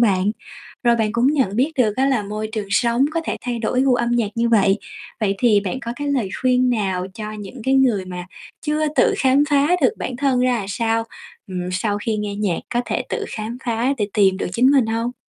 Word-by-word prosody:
bạn, 200 -3 +3 0.5
rồi 235 -1 +4
bạn 220 -1 0
cũng 235 +2 +2
nhận 265 -9 +1
biết 275 +6 +1
được 220 -4 +2
á 265 +1 +2
là 260 -6 +1
môi 215 +1 -4
trường 215 -2 -3
sống 235 +4 +2
có 330 +1 -1
thể - - -2
thay 245 -1 -3
đổi 235 +3 0
gu 265 -2 +3
âm 235 -1 0
nhạc 235 -3 +1
như 235 0 +1
vậy. 200 -2 +3 0.4
Vậy 200 -2 +1
thì 215 -3 +4
bạn 200 +6 -4
có 235 -3 -4
cái 290 0 -3
lời 255 -9 0
khuyên 255 -1 +3
nào 190 -5 -1
cho 215 -1 -6
những 215 +3 -8
cái 265 - +2
người 245 -8 +3
mà 180 -1 -7 0.4
chưa 305 0 +1
tự - - +4
khám 265 +1 +4
phá 285 +1 +3
được 255 - +4
bản 250 - -4
thân 260 -1 +1
ra 255 0 +3
là 200 - -4
sao, 225 +1 0 0.4
ừm, 180 -1 -4
sau 205 +2 -1
khi 215 +1 -2
nghe 210 -1 -3
nhạc 200 -5 -1 0.2
có 240 - +3
thể - - -2
tự 430 - -2
khám 225 +3 -5
phá 235 +3 0
để 205 -1 0
tìm 195 -3 +4
được - - -3
chính 250 +6 +4
mình 270 -5 +4
hông? 230 +2 -2
230 Hz, 235 wpm, -21 LUFS, 205-255 Hz, 0.5 s, rồi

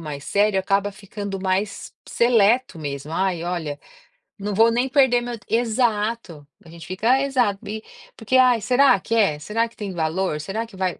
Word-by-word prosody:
mais 145 -3 -7
sério, 205 -1 +2
acaba 195 +1 0
ficando 200 0 -7
mais 190 +2 -2 0.2
seleto 235 -3 +2
mesmo. 145 +1 -6
“Ai, 185 -2 -1
olha, 165 -5 -4 0.6
não 205 +1 -4
vou 225 +3 +4
nem 245 +3 +1
perder 260 -3 +3
meu 240 -1 -5
t - - -25
"Exato. 225 - -1 0.2
A 165 - -16
gente 165 0 -11
fica 225 +8 +2
exato. 245 -8 0
E, 215 +1 -5 0.3
porque: 225 +4 -2
"Ai, 250 -3 +4
será 250 -2 +4
que 230 - -3
é? 195 -10 +2
Será 225 +9 -1
que 230 - -21
tem 205 -3 -5
valor? 165 0 -1
Será 205 +8 -4
que 225 - -16
vai 185 -2 -2
205 Hz, 180 wpm, -22 LUFS, 185-230 Hz, 0.6 s, vou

